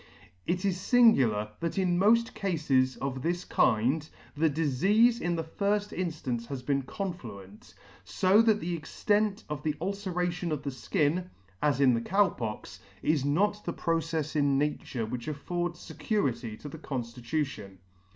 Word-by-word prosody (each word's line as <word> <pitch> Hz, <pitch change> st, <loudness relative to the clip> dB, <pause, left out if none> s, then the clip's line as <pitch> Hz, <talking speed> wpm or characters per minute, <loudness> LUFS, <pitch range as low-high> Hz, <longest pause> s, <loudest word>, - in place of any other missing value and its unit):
It 180 Hz, +2 st, 0 dB
is 190 Hz, -2 st, +1 dB
lingular, 135 Hz, -, +4 dB
that 170 Hz, +3 st, -3 dB
in 180 Hz, -2 st, +2 dB
mofl 230 Hz, +4 st, +4 dB
cafes 150 Hz, -11 st, +1 dB
of 135 Hz, -1 st, -3 dB
this 175 Hz, +4 st, -1 dB
kind 130 Hz, +8 st, +2 dB, 0.3 s
the 160 Hz, +2 st, +3 dB
difeafe 190 Hz, -, +3 dB
in 175 Hz, 0 st, 0 dB
the 165 Hz, -, -2 dB
firfb 205 Hz, +5 st, -1 dB
inffance 150 Hz, -10 st, -3 dB
has 130 Hz, -1 st, -5 dB
been 140 Hz, 0 st, +1 dB
confluent; 130 Hz, -, -7 dB, 0.3 s
fo 195 Hz, +3 st, +4 dB
that 220 Hz, -2 st, +3 dB
the 175 Hz, -2 st, -2 dB
extent 205 Hz, +6 st, 0 dB
of 150 Hz, -2 st, -4 dB
the 150 Hz, -1 st, -1 dB
ulceration 180 Hz, -2 st, -2 dB
on 150 Hz, -2 st, -2 dB
the 140 Hz, -, -3 dB
fkin 165 Hz, +5 st, 0 dB, 0.3 s
(as 145 Hz, -3 st, +2 dB
in 135 Hz, -3 st, +5 dB
the 115 Hz, -, 0 dB
Cow 195 Hz, +9 st, +3 dB
Pox) 105 Hz, -5 st, -6 dB, 0.2 s
is 155 Hz, -3 st, +2 dB
not 205 Hz, +9 st, +1 dB
the 170 Hz, -, -3 dB
procefs 165 Hz, -2 st, -1 dB
in 140 Hz, -2 st, +3 dB
nature 140 Hz, -5 st, -1 dB
which 120 Hz, +3 st, -5 dB
affords 175 Hz, +3 st, -3 dB
fecurity 120 Hz, -, -2 dB
to -, -, -7 dB
the 150 Hz, +2 st, -8 dB
conftitution. 120 Hz, -5 st, -4 dB
160 Hz, 150 wpm, -29 LUFS, 130-185 Hz, 0.3 s, in